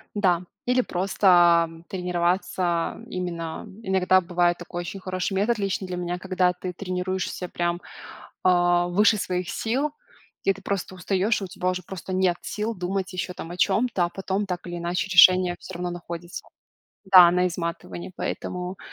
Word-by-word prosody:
Да, 180 -4 +2 0.2
или 250 +1 +3
просто 175 -4 +3
тренироваться 180 -1 -1
именно, 170 -5 -4 0.2
иногда 185 -1 +3
бывает 175 -1 +1
такой 175 0 -6
очень 195 +3 -6
хороший 185 +1 -3
метод, 210 +5 +1
лично 195 -2 -2
для 180 - -4
меня, 175 0 -3
когда 185 -1 +1
ты 180 0 -6
тренируешься 185 0 -3
прям, 175 0 -2 0.6
а, 175 -1 +3
выше 205 +4 +4
своих 180 -2 -2
сил, 265 +7 -1 0.5
и 195 - +3
ты 195 - -14
просто 195 -1 -3
устаешь, 195 +4 0
у 195 - -4
тебя 185 -1 -2
уже 185 0 -3
просто 185 +1 -7
нет 185 -1 +2
сил 215 +2 -3
думать 190 +1 -3
еще 180 0 -3
там 165 - -8
о 175 - -7
чем-то, 195 0 +2
а - - -4
потом 195 +3 -2
так 180 -2 -5
или 175 0 -5
иначе 175 +3 -2
решение 185 0 +7
всё 190 - -9
равно 175 0 -3
находится. 175 0 -7 0.6
Да, 185 -3 +8
на 180 0 +2
изматывании. 170 +1 -5
Поэтому, 180 +1 -4
180 Hz, 160 wpm, -25 LUFS, 175-190 Hz, 0.6 s, Да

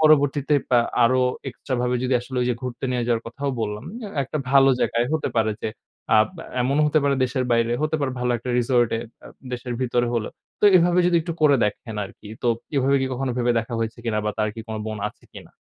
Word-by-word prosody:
পরবর্তীতে 145 -2 +4
এপ - - -20 0.4
আরও 130 +2 +3 0.3
extra 130 +1 -5
ভাবে 125 0 0
যদি 130 - +1
আসলে 125 +1 -8
ওই 125 - +1
যে 120 - +1
ঘুরতে 125 0 -5
নিয়ে 125 -1 0
যাওয়ার 115 -1 +1
কথাও 140 +5 -3
বললাম, 105 +1 -3 0.2
অ্যা 215 - -6
এ - - -1
একটা 135 +3 -4
ভালো 135 0 +6
জায়গায় 120 +1 +1
হতে 160 - 0
পারে 110 -1 +2
যে - - -1 0.5
আব 110 - +5 0.4
এমনও 140 +4 +2
হতে 155 +1 +3
পারে 140 - +3
দেশের 130 +1 -1
বাইরে, 115 0 +2
হতে 155 +1 +1
পারে 135 -2 -1
ভালো 125 0 0
একটা 120 +2 -5
resort 120 -1 +3
এ - - -3 0.2
অ্যা - - -13 0.2
দেশের 125 0 -4
ভিতরে 120 -1 +1
হলেও। 115 -2 -2 0.3
তো - - +2
এভাবে 175 0 +3
যদি 175 -1 +3
একটু 170 +1 -4
করে 145 -2 +6
দেখেন 105 +2 -3
আরকি। 105 - -12
তো - - -1 0.3
এভাবে 135 +1 +3
কী 130 - 0
কখনো 130 0 -2
ভেবে 120 0 +2
দেখা 115 +1 -4
হয়েছে 115 +1 -3
কিনা 110 -2 0
বা 105 - +1
তার 110 0 +1
কী 115 - -7
কোনো 110 - -4
বোন 110 -1 -4
আছে - - -20
কিনা? - - -12
125 Hz, 230 wpm, -23 LUFS, 115-140 Hz, 0.5 s, ভালো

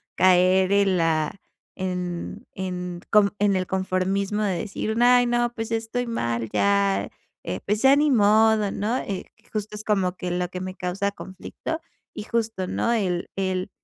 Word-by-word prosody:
caer 185 +1 +4
en 200 -2 +3
la 160 0 +1 0.4
en 180 -2 -4
en 180 -2 -5
con 210 -1 +4
en 205 -1 +3
el 185 -1 -1
conformismo 190 +2 -1
de 190 -4 0
decir: 220 0 -3
"Ay 245 0 +6
no, 240 0 +1
pues, 225 -1 -5
estoy 230 +2 -2
mal 115 - -2
ya, 100 -1 +2 0.3
eh, 90 - -4
pues 210 +2 0
ya 270 +1 +7
ni 295 +1 +3
modo, 215 -2 +4
¿no?" 225 +5 -1
Eh, 195 -2 -4 0.3
justo 210 0 -4
es 210 - -6
como 190 -4 +1
que 180 -1 -4
lo 180 0 -1
que 180 0 -6
me 185 0 -5
causa 195 +3 -2
conflicto, 200 - -7 0.3
y - - -6
justo, 225 -4 -2
¿no?, 235 - 0
el 185 -6 -1
el 190 0 -1
195 Hz, 165 wpm, -24 LUFS, 180-220 Hz, 0.4 s, ya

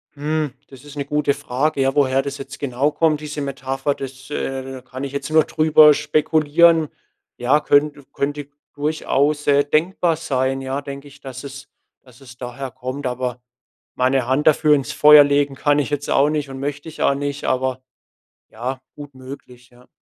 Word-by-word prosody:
Hm, 150 0 -2 0.2
das 135 -2 -14
ist 145 -1 -12
'ne 140 - -3
gute 150 0 0
Frage, 145 +1 -1
ja. 135 0 +2
Woher 135 -2 +2
das 140 0 -5
jetzt 135 - -9
genau 140 +1 0
kommt, 155 -1 +1
diese 150 -1 -5
Metapher, 135 0 -2
das, 135 -1 -9
äh 135 -2 -3
da 130 -1 -8
kann 130 +1 -8
ich 140 - -4
jetzt 140 0 -4
nur 155 0 +4
drüber 155 -1 +5
spekulieren. 155 +2 +3 0.5
Ja, 130 +5 +2
könnte 145 0 +1
könnte 145 0 -3 0.3
durchaus, 145 0 0
äh, 145 0 +4
denkbar 165 +3 +1
sein, 135 -4 -1
ja, 135 +1 -3
denke 140 0 -8
ich, 140 0 -16
dass 130 0 -9
es 140 0 -9 0.3
dass 125 0 -20
es 125 -2 -14
daher 130 +1 -7
kommt. 130 +4 -6
Aber 125 0 -3 0.6
meine 130 0 +1
Hand 130 +5 0
dafür 150 0 +5
ins 135 -2 -3
Feuer 150 0 +8
legen 145 -1 +1
kann 145 +1 +1
ich 145 - -1
jetzt 145 -1 -3
auch 140 +2 +3
nicht 150 -2 -2
und 135 0 -8
möchte 145 +2 -5
ich 160 - -9
auch 140 - +3
nicht, 145 0 -4
aber, 130 0 -1 0.7
ja, 125 +4 -5
gut 145 -2 -11
möglich, 130 -2 -12
ja. 125 0 -21
140 Hz, 185 wpm, -20 LUFS, 130-150 Hz, 0.7 s, Feuer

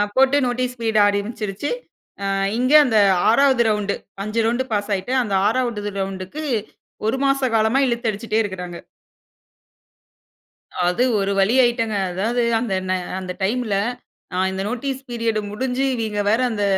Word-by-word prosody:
போட்டு 270 +2 +4
notice 250 0 -2
period 220 -1 +2
ஆரம்பிச்சிருச்சசு. 205 +3 -2 0.5
அ - - -1 0.3
இங்க 255 +4 +1
அந்த 225 -4 +2 0.3
6ஆவது 260 +1 +4
ரவுண்ட்டு 210 -1 0 0.3
5 215 +2 -2
ரவுண்ட் 240 +3 +1
பாஸ் 205 0 -1
ஆகிட்டு 190 +7 -4
அந்த 205 - -4
6ஆவது 225 -4 -1
ரவுண்ட்க்கு 195 +9 -4 0.6
1 245 +4 +1
மாச 275 -1 +2
காலமா 220 +4 +3
இழுத்து 235 -1 0
அடிச்சுட்டே 215 +1 -2
இருக்காங்க. 180 -4 -6 2.1
அது 180 +8 +2 0.2
ஒரு 195 0 0
வழி 200 +5 +3
ஆயிட்டேங்க. 230 -3 +1 0.2
அதாவது 220 +7 0 0.2
அந்த 225 -5 -2 0.5
அந்த 185 -1 -5
ந - - -27
டைம்ல 220 +1 0 0.6
அ - - -1
இந்த 190 - -3
நோட்டீஸ் 265 +3 -3
பீரியட் 230 -2 -1
முடிஞ்சு 255 +4 -2
இவைய்ங்க 215 -3 -2
வேற 225 - +2
அந்த 205 -2 -2
225 Hz, 140 wpm, -21 LUFS, 205-250 Hz, 2.1 s, போட்டு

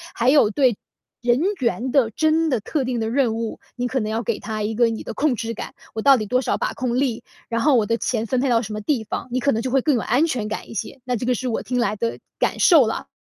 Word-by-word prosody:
还 240 +2 +2
有 280 -7 +5
对 250 -3 +2 0.4
人 240 +2 +2 0.2
员 250 +1 -1
的 250 -5 +3
真 315 +6 +2
的 250 -6 +1
特 285 +7 -2
定 245 -1 -2
的 220 0 -1
任 245 -3 +1
务， 225 -1 -4 0.2
你 245 0 -2
可 260 +1 -1
能 215 -2 -2
要 225 +1 -1
给 220 0 -2
他 215 -1 -4
一 215 +1 -2
个 240 +2 +4
你 225 - -4
的 - - -6
控 290 -3 +1
制 230 0 -4
感， - - -7 0.2
我 220 - -2
到 275 +2 +7
底 215 - -2
多 250 +4 +2
少 - - 0
把 - - -2
控 250 -1 -1
力？ 255 -5 -1 0.3
然 230 0 0
后 285 +1 +4
我 225 -3 +3
的 230 - +1
钱 230 -2 -1
分 255 +3 0
配 270 - +1
到 230 -2 +3
什 215 -2 -7
么 215 - -3
地 245 -1 0
方？ 210 - -5
你 255 - 0
可 280 +2 +2
能 225 - 0
就 255 - -2
会 270 0 +3
更 290 -1 +2
有 235 - 0
安 275 +8 +2
全 240 -9 -2
感 215 - -5
一 - - -8
些， 215 - -5
那 250 -1 0
这 240 - -3
个 250 - +2
是 255 +2 -3
我 230 - -2
听 250 0 -2
来 215 -3 +1
的 230 +2 -3 0.2
感 - - 0
受 315 -8 +6
啦。 - - -4
240 Hz, 315 characters per minute, -22 LUFS, 225-260 Hz, 0.4 s, 到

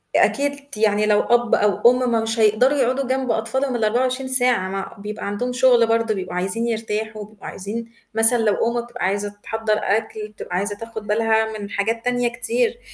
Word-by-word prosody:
أكيد 285 0 +1
ت 225 - -9
يعني 210 -1 +2
لو 210 -1 +4
أب 240 -1 +3
أو 210 +3 +4
أُم 245 -3 +1
مش 225 +1 -2
هيقدروا 225 +7 +4
يقعُدوا 260 +1 +1
جنب 260 -1 0
أطفالهم 255 +4 -1
ال24 250 +4 0
ساعة، 245 -7 +1
مع 195 0 -5
بيبقى 210 +1 -6
عندهم 245 +5 -2
شُغل 250 -2 +4
برضه، 230 -1 +1
بيبقوا 185 -2 -5
عايزين 195 +6 -1
يرتاحوا، 215 -1 -3
بيبقوا 215 -1 -13
عايزين 225 +4 -6 0.2
مثلًا 225 +2 +4
لو 220 -3 +2 0.2
أُم - - +1
بتبقى 240 -6 -4
عايزة 205 +2 -1
تحضّر 220 0 -1
أكل، 215 +1 -1
بتبقى 210 -4 -7
عايزة 205 +2 -2
تاخُد 225 -1 -8
بالها 220 0 +1
من 200 - -6
حاجات 225 +4 -2
تانية 245 -1 +1
كتير، 465 - -1
225 Hz, 180 wpm, -21 LUFS, 210-245 Hz, 0.2 s, لو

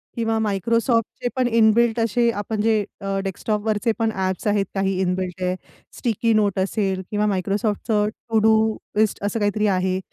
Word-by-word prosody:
किंवा 225 -1 0
Microsoftचे 230 +4 0
पण 255 -1 +2
in 225 -2 +4
built 235 0 +2
असे 230 +1 +2
आपण 210 +1 -3
जे 215 -1 +2 0.2
अ, 195 0 -2
डेस्कटॉपवरचे 210 +3 -1
पण 225 -1 +1
ॲप्स 190 +1 -2
आहेत 205 -1 +2
काही 195 -1 0
इन 180 -1 +1
बिल्ट 185 0 -5
आहे. 180 0 0 0.4
Sticky 230 -1 +1
Notes 200 -2 +1
असेल 190 -2 -1
किंवा 210 0 +1
Microsoftचं 210 +2 0 0.3
To 220 - +5
Do 220 - +6 0.4
लिस्ट 215 -2 +1
असं 205 +2 -1
काही 205 0 +2
तरी 210 0 +1
आहे. 185 0 0
210 Hz, 170 wpm, -22 LUFS, 195-225 Hz, 0.4 s, Do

